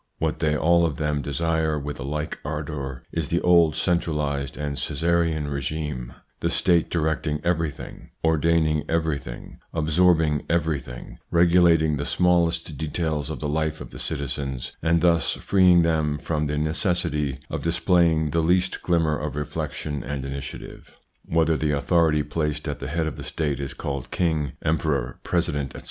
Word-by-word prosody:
What 80 0 -1
they 75 -2 +1
all 85 +3 +4
of 80 -5 0
them 75 -1 0
desire 80 +2 0
with 75 0 -5
a - - -4
like 75 +2 -3
ardour 70 -4 -4
is 80 -3 -2
the 85 - +1
old 85 -3 +5
centralised 75 -6 -1
and 75 -1 -3
Caesarian 80 0 0
regime, 70 -2 -3 0.3
the - - 0
State 85 -3 +2
directing 80 -2 0
everything, 80 -4 -3
ordaining 80 -1 +2
everything, 80 -7 -3 0.2
absorbing 80 -1 +3
everything, 75 -8 -2
regulating 85 -3 +4
the 70 - -3
smallest 85 -3 +2
details 80 -2 -2
of 80 - -5
the 75 - -1
life 80 +1 -1
of - - -9
the - - -9
citizens, 70 -2 -3
and 85 +1 +2
thus 85 -2 +3
freeing 90 -3 +4
them 80 -3 +1
from 75 0 -2
the 75 +1 -2
necessity 75 -3 0
of - - -3
displaying 85 -2 +2
the 80 - +2
least 90 +3 +1
glimmer 80 -3 +2
of 75 0 -4
reflection 75 0 -4
and 70 +1 -4
initiative. 70 0 -8 0.3
Whether 80 -1 +2
the 75 -2 0
authority 80 0 +2
placed 75 0 -2
at - - -3
the - - -5
head 80 +3 -1
of 80 - -4
the - - -6
State 75 -4 -2
is 70 -1 -5
called 70 -3 -4
king, 80 -6 0
emperor, 75 -5 0
president, 70 -2 -1
etc. - - -6
80 Hz, 155 wpm, -24 LUFS, 75-85 Hz, 0.3 s, old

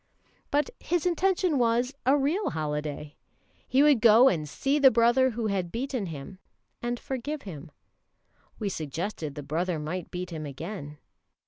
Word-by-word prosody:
But 290 0 +1
his 350 0 -1
intention 360 -3 +2
was 240 +2 +2
a 275 +2 +6
real 305 +9 0
holiday. 150 -1 -4 0.5
He 270 +2 +4
would 290 -6 +5
go 235 +4 +7
and 155 -4 -2
see 280 - 0
the 275 -2 +8
brother 240 +3 +4
who 230 -1 -3
had 190 -5 -1
beaten 250 -3 -3
him, 160 +4 -8 0.4
and 240 0 -2
forgive 275 +3 -4
him. 155 -8 -8 0.9
We 215 - -3
suggested 160 -2 -4
the 145 - -6
brother 165 +4 -1
might 160 +4 -4
beat 180 0 -5
him 155 -2 -5
again. 150 +1 -7
215 Hz, 150 wpm, -27 LUFS, -, 0.9 s, the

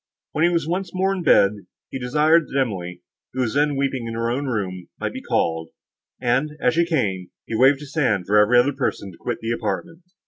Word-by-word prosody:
When 155 - 0
he 170 - +5
was 170 -3 0
once 180 +1 -3
more 190 +1 +1
in 190 - -3
bed, 100 -11 +5 0.4
he 135 - -4
desired 150 +6 +3
that 140 - -1
Emily, 90 -8 -3 0.3
who 130 - -1
was 115 -4 -1
then 145 0 +2
weeping 135 -3 -1
in 115 - -5
her 115 +1 -1
own 140 +3 -2
room, 95 -7 -3
might - - -3
be - - -6
called; 80 -1 -1 0.5
and, 130 +5 0
as 125 - +2
she 170 +1 +2
came, 100 - -1 0.2
he - - -7
waved 135 +5 +4
his 140 -2 -10
hand 105 - +1
for 105 +2 +4
every 110 +4 +5
other 130 +4 +4
person 125 -7 -3
to 85 - -16
quit - - -4
the 115 +1 -2
apartment. 165 +8 -3
130 Hz, 220 wpm, -22 LUFS, 105-150 Hz, 0.5 s, he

